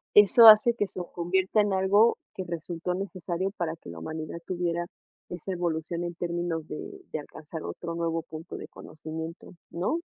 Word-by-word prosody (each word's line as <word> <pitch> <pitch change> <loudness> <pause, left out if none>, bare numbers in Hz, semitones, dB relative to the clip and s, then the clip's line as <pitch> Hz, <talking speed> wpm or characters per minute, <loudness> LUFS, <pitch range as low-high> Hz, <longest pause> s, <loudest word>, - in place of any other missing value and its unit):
eso 210 +3 +9
hace 220 +2 +9
que 205 -3 0
se 185 - -5
convierta 190 +4 +2
en 205 -1 +1
algo 200 +4 +4 0.2
que 185 - -3
resultó 170 +1 -3
necesario 185 -1 -3
para 165 -2 -2
que 165 - -13
la 85 - -8
humanidad 160 - -5
tuviera 175 -1 -1 0.4
esa 175 +2 -5
evolución 170 -1 -2
en 175 0 -4
términos 170 -2 -2
de 395 -1 -7
de 155 - -2
alcanzar 155 +2 -8
otro 170 - -5
nuevo 165 -1 -1
punto 160 +1 -8
de - - -8
conocimiento, 160 +3 -8 0.2
¿no? 185 - -1
175 Hz, 165 wpm, -28 LUFS, 165-190 Hz, 0.4 s, eso